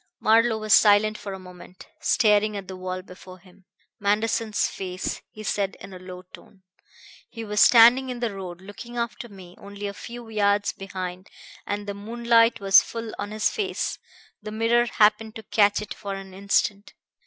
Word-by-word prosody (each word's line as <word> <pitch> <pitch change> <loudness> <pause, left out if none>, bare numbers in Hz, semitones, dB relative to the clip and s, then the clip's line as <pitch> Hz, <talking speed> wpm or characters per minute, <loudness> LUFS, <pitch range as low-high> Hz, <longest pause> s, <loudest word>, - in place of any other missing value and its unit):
Marlowe 225 +1 +3
was 215 0 +1
silent 215 0 +5
for 205 - -7
a 190 - -6
moment, 180 0 -13
staring 215 -2 +2
at 195 -2 -8
the 190 - -7
wall 185 0 -5
before 185 0 -13
him. 185 +1 -22 0.3
"Manderson's 215 +1 0
face," 185 -1 -5
he 215 - -11
said 200 -1 -2
in 195 - -11
a 185 - -9
low 185 0 -10
tone. 195 -2 -16 0.7
"He 230 -1 -8
was 210 0 0
standing 245 +3 +7
in 250 -1 -5
the 235 -3 -2
road, 180 -2 -8
looking 220 +5 -10
after 235 0 -4
me, 185 -3 -13
only 200 0 -9
a 200 - -4
few 235 +3 -9
yards 205 -2 +1
behind, 185 -1 -7 0.4
and 205 0 -3
the 200 - -4
moonlight 230 +2 +2
was 195 -1 +6
full 230 -1 -7
on 205 - -4
his 215 0 0
face. 405 -3 -3 0.4
The 215 - -7
mirror 230 +2 +2
happened 215 0 +2
to 220 - -8
catch 205 -1 +2
it 210 - -7
for 200 -2 -6
an 195 -1 -10
instant. 200 +2 -1
205 Hz, 175 wpm, -24 LUFS, 195-225 Hz, 0.7 s, standing